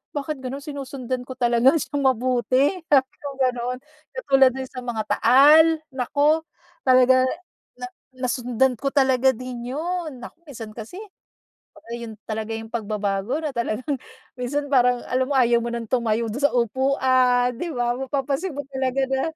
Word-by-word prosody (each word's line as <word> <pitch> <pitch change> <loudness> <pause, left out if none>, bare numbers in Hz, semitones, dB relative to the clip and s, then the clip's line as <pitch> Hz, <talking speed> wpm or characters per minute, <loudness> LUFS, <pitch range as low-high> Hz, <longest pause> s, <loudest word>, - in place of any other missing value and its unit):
bakit 290 0 -3
ganun? 265 +2 -6
Sinusundan 260 -3 -5
ko 260 - -7
talaga 240 +3 +3
siyang 285 -3 0
mabuti" 255 +2 +2 0.2
Sabi 270 -2 +3
kong 280 -2 -7
ganun. 250 +1 -4 0.4
Katulad 270 - +3
din 265 - -4
sa 255 - -7
mga 240 -3 -3 0.2
taal, 305 +6 +6
naku, 285 +4 +1 0.5
talaga 255 0 +5 0.5
na - - -7 0.3
nasundan 250 -1 0
ko 275 - -3
talaga 265 -1 +3
din 250 +1 -6
yun. 320 -5 -4
Naku - - -11
minsan 230 -6 -8
kasi, 225 +9 -9 0.8
kumbaga 310 -7 -17
yun 230 -2 -8
talaga 220 0 -4
yung 225 0 -7
pagbabago 210 +4 -2
na 300 - -1
talagang 255 +2 -3 0.4
minsan 285 +3 -3
parang 250 -2 +3
alam 255 0 +1
mo 285 - -2
ayaw 240 -2 +4
mo 235 0 -4
nang 230 -2 -6
tumayo 230 -2 0
dun 225 - -4
sa 285 -2 +2
upuan 255 0 +2
'di 345 -3 -4
ba? 240 0 -1
Mapapansin 275 +5 -2
mo 285 - -3
talaga 265 0 -1
na, 265 0 0
255 Hz, 155 wpm, -23 LUFS, 240-275 Hz, 0.8 s, taal